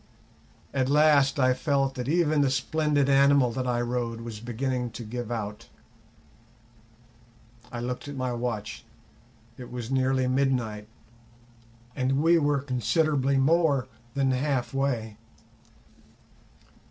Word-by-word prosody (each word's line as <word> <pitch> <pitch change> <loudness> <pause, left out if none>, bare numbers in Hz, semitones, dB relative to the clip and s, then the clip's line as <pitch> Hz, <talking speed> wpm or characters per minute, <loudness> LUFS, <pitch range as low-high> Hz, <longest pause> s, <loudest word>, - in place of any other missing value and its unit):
At 130 -1 0
last 145 -1 +4
I 130 -1 +4
felt 135 0 0
that 125 0 -4
even 155 -2 +2
the 140 - +3
splendid 145 +1 +1
animal 140 -2 +4
that 125 +2 -3
I 120 -1 0
rode 120 -1 -3
was 115 -2 -7
beginning 125 +2 -3
to 120 - -7
give 120 +1 -5
out. 110 0 -5 2.0
I 120 -1 -5
looked 125 +3 -4
at 145 - -6
my 130 -2 -2
watch; 115 -2 -4 0.8
it 125 - -9
was 120 0 -6
nearly 130 0 +1
midnight, 125 -5 0 1.1
and 135 +1 0
we 170 +1 +5
were 145 -2 +1
considerably 135 +2 +1
more 140 -2 +2 0.3
than 135 -1 +2
half 130 -1 -1
way. 120 -6 -2
130 Hz, 120 wpm, -27 LUFS, 120-140 Hz, 2.0 s, we